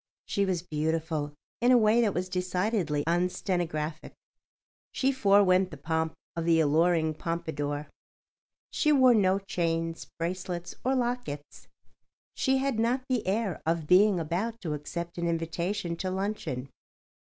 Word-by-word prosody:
She 200 - 0
was 180 -3 -1
beautiful 155 -2 -2 0.3
in 245 +2 +4
a 250 - +7
way 225 +1 +4
that 210 -4 +1
was 180 +1 -1
decidedly 180 -3 -1
unstenographic. 170 -2 -1 0.8
She 270 0 +1
forewent 195 -6 +4
the 150 - -9
pomp 160 +2 -1 0.2
of 165 -1 -2
the 165 -1 +4
alluring 160 +1 +3
pompadour. 150 -3 -3 0.8
She 305 - +2
wore 260 -4 +6
no 195 -3 +3
chains, 165 -4 -2
bracelets 175 0 -4
or 260 +2 +2
lockets. 240 - -3 0.7
She 265 0 +1
had 265 -4 0
not 245 +3 +1
the 245 -7 0
air 200 -2 -1
of 165 -1 0
being 185 +3 +5
about 185 +9 -2
to 160 -5 -3
accept 170 +4 -5
an 170 - 0
invitation 170 +2 -2
to 185 +2 -2
luncheon. 185 -9 -3
175 Hz, 135 wpm, -28 LUFS, 160-205 Hz, 0.8 s, a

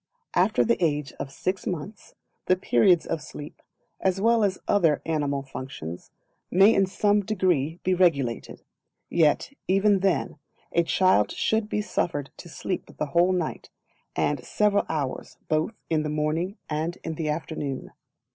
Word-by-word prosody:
After 190 +4 +3
the 235 -5 +1
age 145 -4 0
of 135 - -5
six 185 +6 -3
months, 185 +4 -6 0.3
the 185 - +5
periods 175 0 +3
of 165 -2 -2
sleep, 145 +2 -10 0.4
as 190 0 +1
well 230 +2 +3
as 190 -2 +1
all - - +4
other 165 -7 +3
animal 145 -3 -1
functions, 130 - -7 0.4
may 195 +5 +6
in 195 -1 +3
some 205 +2 +2
degree 180 -6 0
be 185 - +2
regulated; 145 -10 +1 0.5
yet, 165 - +2
even 195 +1 +4
then, 185 -5 0 0.3
a 170 - +3
child 175 - +3
should 220 -1 0
be 210 - -1
suffered 145 -8 -2
to 170 - -11
sleep 185 +3 -5
the - - -1
whole 175 +2 +4
night, 180 -4 -2 0.5
and 145 -3 0
several 205 +7 +1
hours 145 -5 -3
both 155 +8 0
in 160 -1 +1
the 150 - -2
morning 155 +7 -1
and 160 +3 -2
in 165 - -3
the 155 -1 -3
afternoon. 150 -3 -4
170 Hz, 155 wpm, -26 LUFS, 150-195 Hz, 0.5 s, may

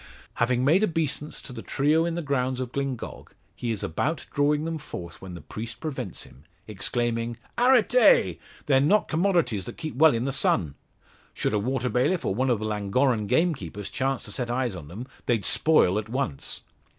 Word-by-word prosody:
Having 125 +1 +2
made 170 +9 +4
obeisance 155 -5 -1
to 130 - -9
the 115 - -7
trio 150 +7 +2
in 170 -1 -2
the 170 - -3
grounds 130 -3 0
of 125 -2 -4
Glyngog, 135 -3 -5 0.2
he 120 - -4
is 110 -4 -1
about 145 - -2
drawing 150 +1 +2
them 165 -1 -3
forth 85 - -8
when 95 -2 -8
the 85 - -9
priest 115 +1 -7
prevents 155 -1 -4
him, 70 - -17 0.2
exclaiming: 115 +2 -2 0.2
"Arretez! 250 - +5 0.3
They're 135 -3 +4
not 200 +9 +3
commodities 160 - +1
that - - -8
keep 160 -2 -5
well 150 +1 +5
in 115 +2 -1
the 135 - -1
sun. 85 - +1 0.6
Should - - -1
a 105 - +2
water 130 +3 -1
bailiff, 165 +10 +1
or - - +1
one 130 +6 0
of 120 - +3
the 110 - -4
Llangorren 105 +2 +1
gamekeepers 125 - 0
chance 135 0 -1
to - - -7
set 125 -3 -3
eyes 120 -3 -1
on 80 -5 -9
them, 105 +10 -7 0.2
they'd 115 -5 +1
spoil 105 - +3
at 110 +1 -7
once. 120 - -3
130 Hz, 185 wpm, -26 LUFS, 110-155 Hz, 0.6 s, Arretez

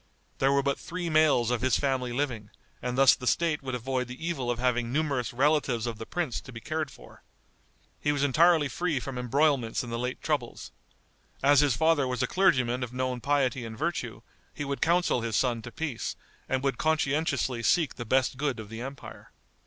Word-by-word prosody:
There 135 +1 +3
were 140 0 +2
but 140 0 0
three 175 -1 -4
males 150 -7 +4
of 125 - 0
his 130 -1 +3
family 130 -3 -1
living, 120 -5 -2 0.3
and 125 0 -3
thus 135 -1 +7
the 125 - -5
State 165 0 +1
would 130 -2 -4
avoid 125 +1 -2
the 130 +7 -6
evil 135 -8 -2
of 120 - 0
having 120 -1 0
numerous 140 -4 0
relatives 135 -3 +1
of 115 -2 -4
the 115 - -7
prince 170 -9 -2
to 135 - -12
be 115 - -8
cared 155 +4 -3
for. - - -15 0.8
He 145 - +1
was 145 -1 0
entirely 155 +2 +4
free 160 -1 -1
from 125 0 -5
embroilments 130 -2 +1
in 120 - -7
the 115 - -2
late 125 +1 -3
troubles. 145 -7 -3 0.7
As 140 0 +6
his 145 -5 +3
father 160 -2 +3
was 125 0 -1
a - - +1
clergyman 130 -10 +2
of 125 -2 -4
known 130 -1 -2
piety 135 -3 +1
and 110 -1 -7
virtue, 145 -8 -3 0.3
he 145 - -4
would 140 0 -4
counsel 170 -6 +2
his 115 -2 -2
son 120 -1 +1
to 120 - -9
peace, 150 -6 -4 0.3
and 130 0 0
would 135 -1 -1
conscientiously 145 -5 0
seek 160 +5 +2
the 120 - -6
best 130 +2 +1
good 140 -4 -1
of 105 -2 -8
the 115 +1 -7
empire. 135 +2 -9
130 Hz, 200 wpm, -28 LUFS, 120-150 Hz, 0.8 s, thus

